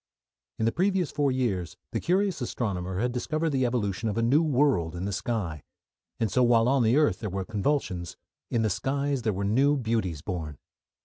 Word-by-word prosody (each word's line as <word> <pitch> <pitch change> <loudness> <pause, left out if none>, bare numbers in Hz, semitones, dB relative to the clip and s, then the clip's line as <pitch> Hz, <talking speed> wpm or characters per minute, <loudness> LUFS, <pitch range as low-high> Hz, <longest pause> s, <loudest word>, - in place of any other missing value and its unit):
In 110 - 0
the 115 - +3
previous 185 0 +1
four 145 -2 +1
years 110 -10 -1
the - - -1
curious 185 -2 +1
astronomer 95 -7 -3
had 120 +5 0
discovered 155 +6 -1
the 130 -3 +2
evolution 110 -3 -1
of 105 - -3
a 115 - +2
new 135 +7 +4
world 135 - +2
in 90 +2 -4
the 100 - -2
sky, 95 - -2 0.6
and 110 -4 0
so 125 - +2
while 120 -1 +4
on 135 -1 +3
earth 130 -5 +3
there 105 - -3
were 95 0 -3
convulsions, 105 - -2 0.3
in 115 -2 +1
the 110 - +1
skies 140 +6 -1
there 110 - 0
were 100 0 -3
new 135 +8 +3
beauties 110 - -1
born. 80 -6 -4
115 Hz, 190 wpm, -27 LUFS, 95-140 Hz, 0.6 s, new